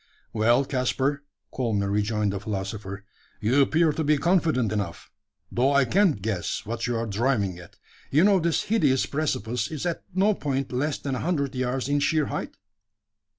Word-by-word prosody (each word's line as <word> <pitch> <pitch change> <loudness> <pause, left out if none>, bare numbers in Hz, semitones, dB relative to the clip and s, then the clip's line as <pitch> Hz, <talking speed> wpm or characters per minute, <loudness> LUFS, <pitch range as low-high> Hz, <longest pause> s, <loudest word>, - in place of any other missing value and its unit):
"Well, 120 +4 +3
Caspar," 135 +2 0 0.3
calmly 110 -6 0
rejoined 105 0 0
the 100 - -3
philosopher, 100 -1 -5 0.3
"you 125 +6 +3
appear 155 +4 +3
to 160 - -2
be 150 0 +3
confident 160 - +2
enough; 100 -6 -4 0.4
though 130 +4 +2
I 140 -2 +4
can't 170 - +2
guess 100 -5 -2
what 115 +2 -3
you 120 -1 -1
are 115 - -1
driving 105 -4 0
at. 85 - -14 0.3
You 150 +5 +4
know 200 -1 +5
this 170 -1 +1
hideous 150 - +2
precipice 125 -6 -2
is 155 +1 -5
at 170 -2 -2
no 200 +3 +4
point 135 -6 -2
less 140 +4 -1
than 140 - -4
a 130 - -2
hundred 150 -5 -1
yards 130 0 -1
in 145 0 +1
sheer 155 +1 +2
height?" - - -5
130 Hz, 170 wpm, -25 LUFS, 110-150 Hz, 0.4 s, know